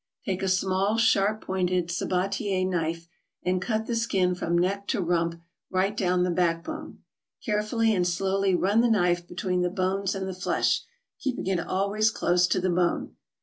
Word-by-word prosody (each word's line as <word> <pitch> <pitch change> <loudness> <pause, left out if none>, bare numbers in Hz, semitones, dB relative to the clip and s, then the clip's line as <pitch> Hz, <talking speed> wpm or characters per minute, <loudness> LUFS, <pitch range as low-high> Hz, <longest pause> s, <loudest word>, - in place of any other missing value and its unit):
Take 190 -1 -2
a 195 - 0
small, 190 +3 +1
sharp 215 -1 +3
pointed 180 -2 -1
sabatier 185 +2 -1
knife 165 -2 -2 0.4
and 180 0 0
cut 220 +2 -1
the 235 - -2
skin 195 -6 +1
from 170 -1 -1
neck 200 +3 0
to - - 0
rump 170 -2 0 0.3
right 190 +2 0
down 180 -3 +1
the 180 - +1
back 170 -1 +1
bone. - - -8 0.4
Carefully 220 +1 +1
and 180 -3 +1
slowly 190 +2 +1
run 200 +5 +3
the 240 - +3
knife 175 -5 +2
between 180 0 -1
the 180 - +1
bones 190 +1 -1
and 190 -1 -3
the 190 - -4
flesh, 185 +1 +1 0.4
keeping 265 -3 -3
it 190 -2 +1
always 200 +5 +1
close 180 -4 +2
to 185 - +1
the 185 0 0
bone. 175 0 0
185 Hz, 175 wpm, -26 LUFS, 180-200 Hz, 0.4 s, sharp